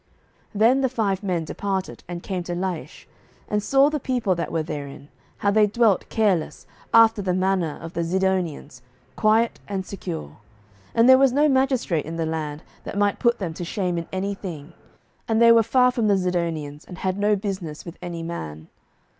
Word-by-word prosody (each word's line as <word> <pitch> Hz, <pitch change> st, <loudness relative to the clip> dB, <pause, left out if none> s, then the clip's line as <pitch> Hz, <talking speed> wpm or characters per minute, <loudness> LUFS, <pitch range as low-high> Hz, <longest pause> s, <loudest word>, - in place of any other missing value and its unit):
07:018:007 -, -, -40 dB, 0.5 s
Then 245 Hz, +5 st, +5 dB
the 265 Hz, -, +2 dB
five 205 Hz, -6 st, -1 dB
men 180 Hz, -5 st, -1 dB
departed, 190 Hz, +2 st, -4 dB
and 175 Hz, 0 st, -6 dB
came 185 Hz, -2 st, -3 dB
to 175 Hz, 0 st, -4 dB
Laish, 180 Hz, -2 st, -5 dB, 0.4 s
and 210 Hz, 0 st, 0 dB
saw 270 Hz, +6 st, +4 dB
the 300 Hz, 0 st, -1 dB
people 245 Hz, -7 st, 0 dB
that 170 Hz, -1 st, -3 dB
were 165 Hz, -1 st, 0 dB
therein, 145 Hz, -1 st, -7 dB, 0.3 s
how 200 Hz, -, +1 dB
they 210 Hz, 0 st, +4 dB
dwelt 215 Hz, -2 st, +2 dB
careless, 200 Hz, -8 st, 0 dB, 0.3 s
after 225 Hz, -2 st, +6 dB
the 185 Hz, -2 st, 0 dB
manner 185 Hz, -4 st, 0 dB
of 165 Hz, +1 st, -8 dB
the 170 Hz, -, -1 dB
Zidonians, 175 Hz, -7 st, -1 dB, 0.3 s
quiet 225 Hz, +2 st, +2 dB
and 195 Hz, -2 st, -3 dB
secure; 170 Hz, -, -6 dB, 0.6 s
and 230 Hz, +1 st, +5 dB
there 260 Hz, 0 st, +8 dB
was 270 Hz, -1 st, +5 dB
no 290 Hz, +4 st, +3 dB
magistrate 260 Hz, -, +1 dB
in 165 Hz, -, -5 dB
the 165 Hz, -1 st, -1 dB
land, 155 Hz, -1 st, -4 dB, 0.2 s
that -, -, -6 dB
might 205 Hz, 0 st, +1 dB
put 235 Hz, -1 st, +2 dB
them 175 Hz, -5 st, -4 dB
to 175 Hz, -, -6 dB
shame 180 Hz, 0 st, -2 dB
in 165 Hz, -, -7 dB
any 195 Hz, +2 st, -2 dB
thing; 170 Hz, -5 st, -8 dB, 0.5 s
and 225 Hz, -1 st, +1 dB
they 230 Hz, 0 st, +7 dB
were 230 Hz, 0 st, +7 dB
far 250 Hz, +3 st, +3 dB
from 235 Hz, -3 st, 0 dB
the 200 Hz, -1 st, +4 dB
Zidonians, 165 Hz, -5 st, -2 dB
and 180 Hz, -, -11 dB
had 190 Hz, +3 st, -2 dB
no 210 Hz, +1 st, +3 dB
business 190 Hz, -6 st, -5 dB
with 170 Hz, 0 st, -10 dB
any 170 Hz, -1 st, -5 dB
man. 80 Hz, -, -7 dB
190 Hz, 190 wpm, -23 LUFS, 165-220 Hz, 0.6 s, there